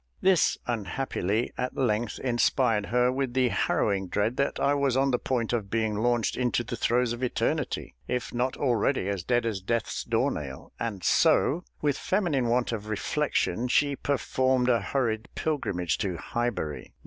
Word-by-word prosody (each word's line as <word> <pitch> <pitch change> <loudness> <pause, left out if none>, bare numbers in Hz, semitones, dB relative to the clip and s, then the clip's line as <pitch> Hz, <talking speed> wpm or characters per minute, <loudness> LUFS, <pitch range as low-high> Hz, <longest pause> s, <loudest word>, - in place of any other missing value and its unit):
This, 190 -4 +3
unhappily, 115 -1 -2
at 125 0 -2
length 115 -3 0
inspired 120 -3 +2
her 125 +2 +3
with 130 -1 -2
the 130 -1 +3
harrowing 100 -4 0
dread 105 +6 0
that 140 - 0
I 140 - +3
was 140 -3 +1
on 135 0 +3
the 125 - +1
point 120 -3 -1
of 110 -5 -1
being 110 -1 0
launched 120 +2 +1
into 125 -1 0
the - - -5
throes 120 0 +1
of 120 - -7
eternity, 125 - -1
if 125 -1 -2
not 125 +2 -1
already 125 -4 +1
as 100 -2 -1
dead 120 +2 +1
as 105 -4 -2
Death's 115 +3 -2
door - - +1
nail, 65 -3 -7
and 105 -6 -3
so, 170 +6 +3 0.2
with 145 -2 +1
feminine 170 - +1
want 120 +1 +1
of 105 -2 -4
reflection, 125 +1 0
she 140 +3 +2
performed 130 -2 +1
a 120 -3 +3
hurried 110 0 -1
pilgrimage 95 - -1
to 95 -4 -2
Highbury. 120 -9 -3
120 Hz, 165 wpm, -27 LUFS, 110-130 Hz, 0.2 s, This